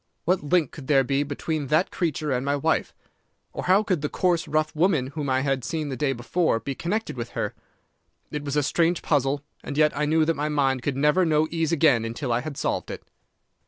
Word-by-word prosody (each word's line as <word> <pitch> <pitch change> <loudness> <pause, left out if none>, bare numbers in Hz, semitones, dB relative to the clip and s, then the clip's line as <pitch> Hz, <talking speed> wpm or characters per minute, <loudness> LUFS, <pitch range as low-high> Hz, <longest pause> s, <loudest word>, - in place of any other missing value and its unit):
What 180 -1 +1
link 160 -1 +2
could 140 -4 -10
there 135 -3 +4
be 135 +2 0
between 145 +1 -3
that 155 +6 +2
creature 155 -3 -1
and 125 0 0
my 140 +1 +1
wife? 160 +3 0 0.6
Or - - -5
how 190 +4 +4
could 185 -8 0
the 150 - -1
coarse, 175 -3 +1
rough 155 0 0
woman 155 -6 +2
whom 145 -2 -3
I 130 0 +2
had 135 -2 0
seen 155 +2 -3
the 135 - -3
day 135 +2 0
before 120 +2 0
be 140 - -4
connected 205 - -3
with 120 -1 -5
her? - - -1 0.8
It 150 -1 -4
was 140 0 -3
a 150 - +2
strange 170 +4 +1
puzzle, 140 -1 +1 0.2
and 140 - -5
yet 150 0 +3
I 150 - 0
knew 155 +1 +3
that 165 - +2
my 150 +2 -2
mind 135 -3 +1
could 135 +1 -2
never 150 +6 +3
know 155 -2 +2
ease 165 -1 0
again 145 -8 +4
until 120 +3 -3
I 120 - +1
had 140 0 -6
solved - - -2
it. - - -7
150 Hz, 225 wpm, -25 LUFS, 135-160 Hz, 0.8 s, there